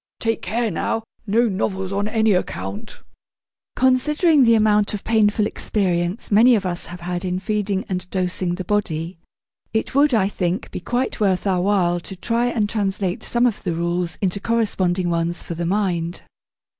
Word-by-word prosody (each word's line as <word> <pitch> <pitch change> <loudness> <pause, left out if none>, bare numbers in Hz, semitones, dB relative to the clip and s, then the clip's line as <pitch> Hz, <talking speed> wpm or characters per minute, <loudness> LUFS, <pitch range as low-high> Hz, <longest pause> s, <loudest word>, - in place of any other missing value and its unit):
Take 225 0 -1
care 225 +3 -1
now! 225 +6 -1 0.2
No 230 +4 +3
novels 190 -2 -2
on 200 +1 -1
any 220 -1 +2
account!' 205 +4 -4 0.7
Considering 290 +4 +3
the 230 0 +5
amount 210 -1 +3
of 200 - -7
painful 215 -1 +2
experience 185 -1 -1
many 235 +4 +6
of 200 -3 -1
us 175 -1 -3
have 175 0 -8
had 175 +1 -3
in 180 -1 -1
feeding 200 -1 -1
and 180 -1 -4
dosing 180 -1 -1
the 185 - -5
body, 170 -4 -2 0.5
it 220 - -1
would, 285 +2 +4
I 195 -3 +3
think, 180 -2 -2
be - - -4
quite 245 +8 -2
worth 195 -3 +1
our 185 -3 +1
while 180 -3 +2
to 170 +3 -7
try 235 +5 0
and 225 -4 0
translate 195 -3 -1
some 240 +1 +1
of 235 -4 0
the 175 -3 -2
rules 170 0 -1
into 190 +1 0
corresponding 190 -6 0
ones 170 +1 -1
for - - -5
the 170 0 -3
mind. 180 -3 -1
195 Hz, 170 wpm, -21 LUFS, 180-220 Hz, 0.7 s, many